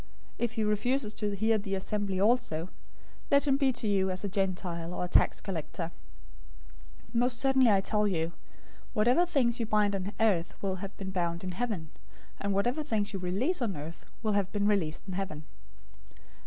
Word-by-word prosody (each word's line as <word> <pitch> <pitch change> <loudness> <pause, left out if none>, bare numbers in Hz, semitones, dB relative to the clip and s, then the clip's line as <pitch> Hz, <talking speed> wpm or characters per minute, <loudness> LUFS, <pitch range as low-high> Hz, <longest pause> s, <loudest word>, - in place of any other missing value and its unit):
If 235 -1 0
he 220 - 0
refuses 215 +2 +1
to 205 -2 -2
hear 220 +2 +2
the 195 -1 -2
assembly 195 0 -2
also, 195 -6 +2 0.6
let 280 +1 +4
him 275 - +5
be 275 -1 +3
to 225 - -2
you 195 -2 +2
as 185 +1 -3
a - - 0
Gentile 180 -3 -2
or - - -1
a - - -3
tax - - +4
collector. 170 -2 -4 1.2
018:018 - - -28
Most 245 0 +2
certainly 265 -2 +4
I 200 -2 +5
tell 210 +1 +2
you, 165 -4 0 0.6
whatever 245 +10 +4
things 250 -7 +2
you 230 - -1
bind 210 -2 +3
on 195 +1 -3
earth 185 -7 +1
will 190 -1 -2
have 195 +1 -7
been 190 -1 -5
bound 170 -2 -1
in 185 - -3
heaven, 185 -6 -3 0.5
and 200 - -1
whatever 240 +9 +1
things 215 -7 -1
you 195 - -2
release 210 - 0
on 210 -8 -1
earth 155 +3 -8 0.2
will 215 -1 +1
have 200 -2 +1
been 205 -1 0
released 190 -7 +1
in 190 - -4
heaven. 180 -5 -4
200 Hz, 185 wpm, -30 LUFS, 185-225 Hz, 1.2 s, him